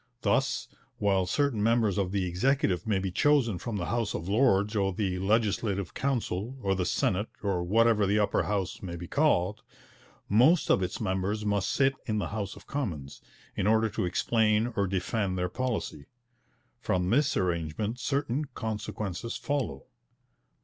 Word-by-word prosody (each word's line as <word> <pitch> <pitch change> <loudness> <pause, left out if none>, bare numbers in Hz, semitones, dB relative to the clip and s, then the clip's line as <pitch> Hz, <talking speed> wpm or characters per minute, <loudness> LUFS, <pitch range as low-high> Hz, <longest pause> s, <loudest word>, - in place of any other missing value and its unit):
Thus, - - +1 0.3
while 95 -3 +1
certain 140 0 +1
members 110 -3 +2
of 95 -2 -1
the 95 -2 0
Executive 95 +2 +1
may 105 -3 +2
be 95 -1 -2
chosen 120 -4 +2
from 115 -4 -4
the 85 - -2
House 115 -1 -1
of 85 - -5
Lords 105 -1 +3
or 95 -2 +1
the 95 -1 -2
Legislative 100 -1 0
Council 125 -3 -2
or 95 -1 +2
the 90 -2 -1
Senate 100 +3 0
or 95 -3 0
whatever 105 +2 +3
the 100 +2 +2
Upper 105 -1 +2
House 100 -3 -2
may 85 -3 -5
be 85 0 -7
called, 110 - +1 0.7
most 130 - +4
of - - +4
its 90 0 -3
members 100 +1 -1
must 100 -2 0
sit 135 -1 +3
in 110 -2 0
the 95 -6 -2
House 100 -2 -4
of - - -14
Commons, 80 - -4 0.3
in 95 - 0
order 110 +1 +3
to 100 - -2
explain 110 +4 +1
or 100 -1 +1
defend 95 +1 -1
their 90 0 -1
policy. 120 - -3 0.7
From 90 -1 0
this 145 +4 +2
arrangement 90 +6 -1
certain 140 +1 -1
consequences 110 -1 -4
follow. 130 - -2
105 Hz, 160 wpm, -28 LUFS, 95-115 Hz, 0.7 s, most